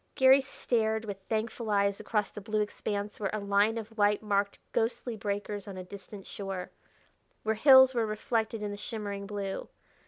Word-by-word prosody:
Garry 265 0 +7
stared 220 -4 -1
with 200 -2 -5
thankful 220 +1 -2
eyes 200 -1 +2
across 210 -2 -1
the 210 - -8
blue 215 +2 -1
expanse 205 0 -3
where 200 -2 -1
a - - 0
line 205 +2 +2
of 225 0 -7
white 205 +1 +3
marked 200 -1 0
ghostly 235 +1 -1
breakers 205 0 -3
on 195 -2 -7
a 185 - -5
distant 195 +1 -10
shore; 195 -2 -5 0.7
where 220 - +1
hills 260 +2 +8
were 230 -3 +1
reflected 220 0 -1
in 205 - -2
the 205 - -5
shimmering 205 -2 -5
blue. 200 -2 -4
210 Hz, 175 wpm, -30 LUFS, 200-225 Hz, 0.7 s, hills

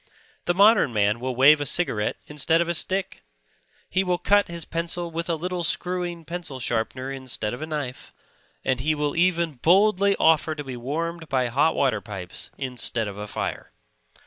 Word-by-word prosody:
The 175 - +1
modern 200 - +5
man 105 +1 +2
will 130 +1 -3
wave 145 +4 +6
a - - -1
cigarette 110 -12 0
instead 150 +2 +1
of 170 - +1
a 170 - 0
stick; 190 +3 -2 0.7
he 190 +2 +1
will 180 -1 0
cut 205 +3 +3
his 170 -1 -4
pencil 170 +1 -3
with 170 +1 -4
a 170 - +2
little 180 +2 -3
screwing 175 +1 -1
pencil 170 -4 -6
sharpener 125 +3 -2
instead 130 -5 -4
of 125 - -7
a 155 - -4
knife; 145 -5 -5 0.5
and 130 -1 +1
he 155 +4 +1
will 145 -1 -1
even 170 -5 +1
boldly 200 +2 +4
offer 160 -1 +3
to 150 - -5
be 130 -2 -6
warmed 160 +6 -4
by 130 -2 +1
hot 145 +7 +2
water 125 -7 +1
pipes 95 -5 -8
instead 125 -4 -2
of 100 -1 -7
a 105 - -5
fire. - - -5
155 Hz, 180 wpm, -24 LUFS, 130-175 Hz, 0.7 s, wave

